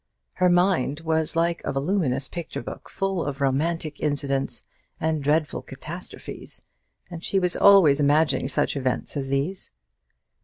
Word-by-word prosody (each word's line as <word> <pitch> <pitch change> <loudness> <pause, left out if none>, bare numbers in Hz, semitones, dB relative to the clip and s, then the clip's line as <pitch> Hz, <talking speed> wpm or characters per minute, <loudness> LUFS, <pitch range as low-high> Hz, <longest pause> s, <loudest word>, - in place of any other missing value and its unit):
Her 185 -1 +4
mind 175 -5 +2
was 160 0 0
like 170 0 +1
a - - -2
voluminous 140 -2 0
picture 170 -7 -6
book, - - -8
full 195 -3 -1
of 140 -1 -4
romantic 150 +3 0
incidents 140 -2 -1 0.3
and 160 -2 0
dreadful 150 +2 +1
catastrophes; - - -7 0.5
and 170 0 -7
she 195 - 0
was 180 -2 +2
always 185 -8 +6
imagining 145 -2 +3
such 135 - +1
events 130 +1 -2
as 135 -2 -2
these. 140 +8 -1
155 Hz, 140 wpm, -25 LUFS, 140-170 Hz, 0.5 s, always